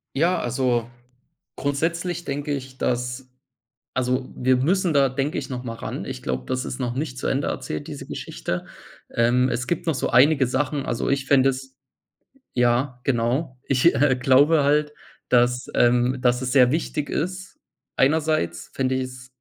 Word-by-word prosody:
Ja, 170 +5 +2
also 120 -1 0 0.7
grundsätzlich 170 +5 -2
denke 145 +1 -3
ich, 130 -1 -6
dass 125 +1 -2 0.7
also 130 0 -1
wir 130 +1 +2
müssen 175 +6 +1
da 140 -2 +4
denke 135 +3 -2
ich, - - -4
noch 125 -1 -5
mal 115 -1 -4
ran. - - -5
Ich - - -6
glaube, 65 0 -3
das 130 0 -1
ist 125 - -5
noch 120 -2 -2
nicht 135 -2 -3
zu - - -2
Ende 140 +1 0
erzählt, 75 - -4
diese - - -7
Geschichte. - - -4 0.5
Ähm, 125 +2 +3
es 120 +1 -2
gibt 175 0 -2
noch 160 - +2
so 130 - -1
einige 135 +2 +5
Sachen, 140 +2 -1
also 120 - -2
ich 140 -1 0
fände 135 -1 +4
es 130 0 -6 0.8
ja, 125 +1 +1
genau, 130 +2 0
ich, 135 +6 +3
äh, 140 -1 +3
glaube 145 +4 +5
halt, 150 +1 +2 0.4
dass, 125 0 +2
ähm 125 +2 +3
dass 125 0 +2
es 130 -1 -2
sehr 125 -3 +6
wichtig 150 -1 -2
ist, 185 +4 -4 0.4
einerseits 140 - +1
fände 130 -1 0
ich 130 - 0
es 130 0 -9
130 Hz, 165 wpm, -23 LUFS, 125-145 Hz, 0.8 s, sehr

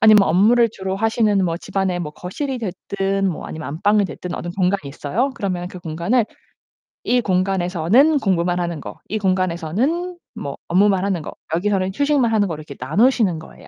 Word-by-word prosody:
아니면 215 -1 +8
뭐 195 - +3
업무를 225 +7 +5
주로 190 -2 -4
하시는 215 -2 +2
뭐 165 -1 0
집안에 190 -1 -2
뭐 150 -3 -4
거실이 260 - -4
됐든 195 -1 -1
뭐 170 - -4
아니면 155 -2 -6
안방이 205 +7 +2
됐든 180 -1 -6
어느 175 - -5
공간이 185 -5 0
있어요. 185 - -1
그러면 180 -5 -3
그 180 - -9
공간을 175 +8 0 0.8
이 245 0 +2
공간에서는 190 - +2
공부만 180 -4 +1
하는 170 -3 -2
거, - - -9
이 215 - -1
공간에서는 190 - 0 0.2
뭐 140 -1 -5
업무만 190 +1 +3
하는 190 -5 0
거, - - -7 0.2
여기서는 190 +1 0
휴식만 285 -5 +2
하는 210 -2 +2
거로 160 -4 -5
이렇게 145 -2 -10
나누시는 195 - +2
거예요. 160 - -14
190 Hz, 405 characters per minute, -21 LUFS, 175-220 Hz, 0.8 s, 아니면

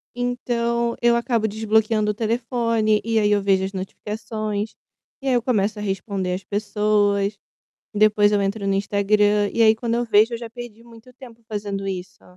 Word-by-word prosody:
Então 235 -1 -1
eu 235 0 +4
acabo 235 -2 0
desbloqueando 215 0 +1
o - - -5
telefone 230 -1 0
e 225 -1 +2
aí 210 0 +2
eu 205 -1 +3
vejo 195 -1 +2
as 195 - -5
notificações. 210 +2 -4 0.5
E 270 - -5
aí 260 - +3
eu 240 - +2
começo 215 -4 0
a - - -5
responder 195 -2 -2
as 185 - -4
pessoas, 205 -1 0 0.6
depois 210 0 +4
eu 205 -1 +2
entro 200 +1 -2
no 195 - +1
Instagram, 205 +1 +2
e 230 - +1
aí 220 -1 +6
quando 230 +1 -2
eu 240 0 0
vejo 220 +2 +4
eu - - -2
já 230 -1 -8
perdi 235 -2 -10
muito 235 +1 -16
tempo 235 -3 -14
fazendo 200 -2 -4
isso. 185 -2 -6
215 Hz, 180 wpm, -22 LUFS, 205-230 Hz, 0.6 s, aí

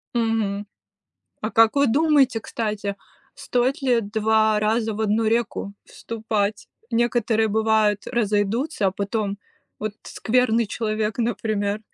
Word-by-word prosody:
Мгм. 220 -3 0 0.8
А 215 - -3
как 225 +3 +4
вы 280 0 +4
думаете, 275 -2 +3
кстати, 210 -3 -3 0.4
стоит 250 +3 -1
ли 250 -3 +2
два 215 0 +2
раза 220 +1 +1
в 210 - -5
одну 220 +1 +1
реку 220 -3 -1
вступать? 215 -2 -3 0.2
Некоторые, 230 -2 +1
бывает, 215 -1 +2
разойдутся, 215 +2 0
а - - +3
потом 200 +1 -2 0.4
вот 215 -1 -3
скверный 235 -1 +1
человек, 215 -1 -2
например, 215 -3 -1
220 Hz, 115 wpm, -23 LUFS, 210-235 Hz, 0.8 s, как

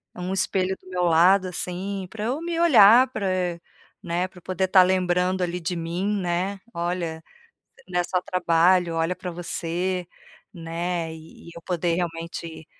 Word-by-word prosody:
um 180 +1 -4
espelho 190 0 0
do - - -16
meu 180 -1 -1
lado, 180 +3 +4
assim, 185 +2 -4
pra 215 +1 -5
eu 260 +7 -2
me 335 0 -3
olhar, 255 -6 +7
pra 200 -6 -3
eh 180 -2 -1 0.4
né, 175 +1 -1
pra 180 - -20
eu - - -25
poder 185 +2 -1
tá 185 0 +7
lembrando, 180 0 +1
ali, 175 0 -2
de 175 +1 -3
mim, 170 +3 -3
né: 180 +3 -2
"Olha, 170 -2 -3 0.7
né 180 -1 0
só 180 0 -1
trabalho, 180 -1 +2
olha 165 +2 0
pra 180 - -6
você", 175 +1 -3 0.5
né, 170 -1 -4
e 160 +1 -13
eu 170 - -11
poder 175 -1 -1
realmente, 165 -2 -5
180 Hz, 160 wpm, -24 LUFS, 170-185 Hz, 0.7 s, olhar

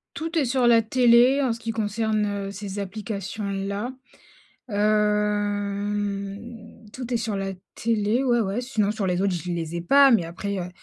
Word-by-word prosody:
Tout 330 +1 -3
est 290 - +3
sur 255 0 +1
la 230 -1 +6
télé 245 +3 +4
en 255 -4 +1
ce 230 - -8
qui 230 0 -3
concerne, 220 0 0
heu, 200 -1 -3
ces 200 0 -6
applications-là. 200 +1 -4 0.8
Hem, 205 +1 -1
tout 250 -1 -6
est - - +3
sur 220 -3 -2
la 195 0 -3 0.2
télé. 225 +2 0
Ouais, 240 -2 +3
ouais. 205 +2 -1
Sinon 220 -5 0
sur 210 -2 -2
les 180 0 0
autres, 195 -2 +1
je 175 +1 -4
les 170 -1 -4
ai 170 - -2
pas 275 +9 +6
mais 220 -8 +4
après, 195 +4 -4
heu, 180 -1 -4
210 Hz, 170 wpm, -24 LUFS, 200-230 Hz, 0.8 s, la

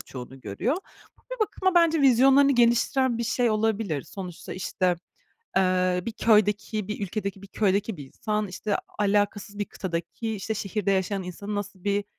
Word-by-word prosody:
çoğunu 130 +1 -9
görüyor. 115 - -1 0.4
Ama - - -30
bir - - -13
bakıma 375 -3 +1
bence 330 -2 +4
vizyonlarını 270 +2 +6
geliştiren 240 +1 +3
bir 235 - -1
şey 240 0 +1
olabilir. 215 -8 0
Sonuçta 180 -4 -8
işte, 185 -1 0 0.6
eee, 185 -1 +2
bir 230 - -2
köydeki 210 -1 +2
bir 210 - -4
ülkedeki 200 0 -4
bir 200 - -11
köydeki 200 -1 0
bir 140 - -8
insan, 210 +8 -2
işte, 200 +3 -2 0.2
alakasız 205 0 0
bir 205 - 0
kıtadaki 190 +5 -4
işte 210 +3 -3
şehirde 200 -1 -1
yaşayan 190 0 0
insanın 200 +4 -5
nasıl 205 -2 -5
bir 205 0 +1
205 Hz, 160 wpm, -26 LUFS, 190-225 Hz, 0.6 s, vizyonlarını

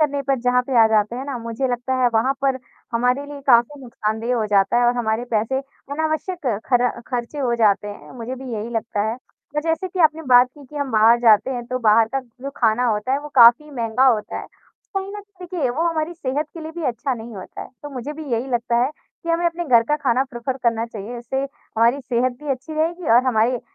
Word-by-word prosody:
करने 285 -2 +1
पर 270 -1 0
जहाँ 250 0 +2
पे 255 -1 -2
आ - - +6
जाते 215 +2 +1
हैं 265 - -5
ना, 280 -3 -4
मुझे 230 +3 -3
लगता 245 +1 -2
है 245 - +5
वहाँ 245 +5 +3
पर 265 -1 +1 0.3
हमारे 250 +4 +1
लिए 290 -1 -8
काफ़ी 250 +3 +4
नुकसानदेह 225 0 -2
हो 220 - 0
जाते 200 +1 +3
है 245 - +3
और 245 +1 +2
हमारे 225 0 -1
पैसे 225 +4 0 0.3
अनावश्यक 315 +1 -2 0.2
खर 245 -1 +3 0.2
खर्चे 245 +3 -4
हो 245 -3 +1
जाते 210 -2 +2
हैं, 205 - -10
मुझे 240 +2 -5
भी 260 -1 -8
यही 220 0 -4
लगता 225 -2 -2
है। - - -3 0.4
अ, - - +3
जैसे 330 +3 -1
कि 370 - -7
आपने 320 0 +3
बात 250 -2 +6
की, 290 - -14
कि 295 +3 -13
हम 285 -2 -2
बाहर 225 +2 +5
जाते 225 +1 +5
हैं, 245 -2 -4
तो 255 +1 -2
बाहर 220 -1 +4
का 270 - +1
जो 255 +2 -9
खाना 235 +1 +2
होता 220 +2 0
है 275 - +2
वो 295 - -8
काफ़ी 245 +4 +7
महँगा 245 0 +1
होता 215 -5 +1
है, - - -8 0.5
कहीं 390 0 -2
ना 415 - -6
देखिए, 365 -7 -4
वो 300 +7 -1
हमारी 330 +1 -2
सेहत 290 -1 -2
के 330 - -8
लिए 315 0 -7
भी 340 -1 -5
अच्छा 255 +1 -1
नहीं 230 0 -9
होता 185 - -9
है। - - -11
तो 290 - -7
मुझे 270 +2 -5
भी 310 +1 -8
यही 235 +3 0
लगता 240 0 0
है, 265 - -1 0.3
कि - - -7
हमें 335 +1 +1
अपने 340 +1 -2
घर 235 -5 +5
का 295 +5 0
खाना 260 -3 +1
प्रेफर 240 +2 -4
करना 230 -2 +1
चाहिए, 225 +1 -7
इससे 240 +3 -4
हमारी 260 -2 0
सेहत 250 0 0
भी 300 - -7
अच्छी 270 +4 -4
रहेगी 330 +2 -1
और 240 +3 +6
हमारे 240 0 +2
250 Hz, 235 wpm, -21 LUFS, 230-290 Hz, 0.5 s, काफ़ी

